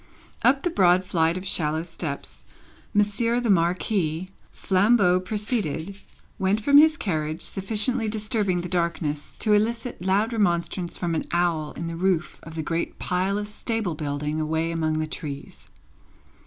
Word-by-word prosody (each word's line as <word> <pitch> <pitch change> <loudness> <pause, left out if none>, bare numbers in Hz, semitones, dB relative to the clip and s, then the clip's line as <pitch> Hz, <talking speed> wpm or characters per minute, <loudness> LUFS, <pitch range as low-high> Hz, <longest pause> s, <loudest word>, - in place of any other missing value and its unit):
Up 270 +1 +3
the 350 - 0
broad 185 - +4
flight 165 -1 +1
of 185 - -6
shallow 160 -3 0
steps, 165 -4 -6 0.5
Monsieur 210 +3 +2
the 240 -3 +1
Marquis, 175 -1 0 0.2
flambeau 195 -1 +3
preceded, 200 - -2 0.4
went 195 +3 +2
from 285 +6 +6
his 315 +1 +5
carriage, 155 - -1
sufficiently 220 +4 0
disturbing 210 -4 0
the 175 - -5
darkness 170 -4 -2
to 215 - +2
elicit 230 0 0
loud 200 +5 +1
remonstrance 175 -4 0
from 170 -2 -2
an 160 - -1
owl 170 -3 0
in 170 - -5
the 165 0 -4
roof 180 -1 0
of 165 0 -11
the 160 - -3
great 165 +2 -2
pile 185 +2 0
of 205 0 -3
stable 215 -3 -2
building 150 +1 -3
away 160 +2 -1
among 160 -1 0
the 155 - 0
trees. 150 -3 -7
180 Hz, 150 wpm, -25 LUFS, 165-210 Hz, 0.5 s, from